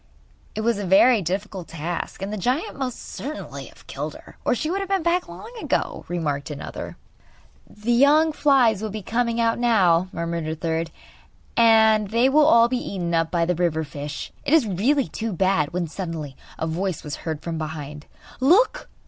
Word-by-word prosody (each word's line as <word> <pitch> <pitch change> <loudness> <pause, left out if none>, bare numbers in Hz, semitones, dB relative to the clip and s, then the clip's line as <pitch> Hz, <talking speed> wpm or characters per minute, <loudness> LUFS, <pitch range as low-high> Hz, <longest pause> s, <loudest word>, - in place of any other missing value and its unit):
'It 215 - -2
was 225 -1 +1
a - - -3
very 200 +5 +5
difficult 190 +1 -4
task, 170 +3 -5
and 200 +2 -4
the - - -1
giant 255 - -1
must 260 -3 -3
certainly 300 +4 -7
have - - -17
killed - - -5
her - - -14
or - - +2
she 310 - -2
would 370 +5 -1
have 390 -1 -4
been 390 -3 +1
back 350 +2 +1
long 465 - -10
ago,' - - -2
remarked 150 -5 -2
another. 150 - -7 0.7
'The 210 +3 -3
young 290 +6 +5
flies 260 -9 +3
will 220 - -3
be 210 0 -6
coming 235 +2 0
out 230 0 +1
now,' 190 -7 +3
murmured 170 -1 -3
a 160 - -2
third, 165 0 -2 0.7
'and 220 -2 +5
they 230 +4 +3
will 300 +2 +5
all 230 -5 +6
be 250 +1 -1 0.2
eaten 170 -2 -2
up 165 -1 +2
by 170 -1 +1
the 180 - +1
river 165 -2 0
fish! 145 0 -6
It 295 - +3
is 310 -7 +4
really 235 +8 +1
too 225 0 -4
bad!' 185 -4 +1
When, 175 -1 -2
suddenly, 160 -5 -6 0.2
a - - -2
voice 175 +1 -2
was 150 -1 -5
heard 160 -2 -5
from 165 -2 -4
behind: 150 -1 -6 0.3
'Look! 415 - +3
200 Hz, 190 wpm, -23 LUFS, 165-245 Hz, 0.7 s, all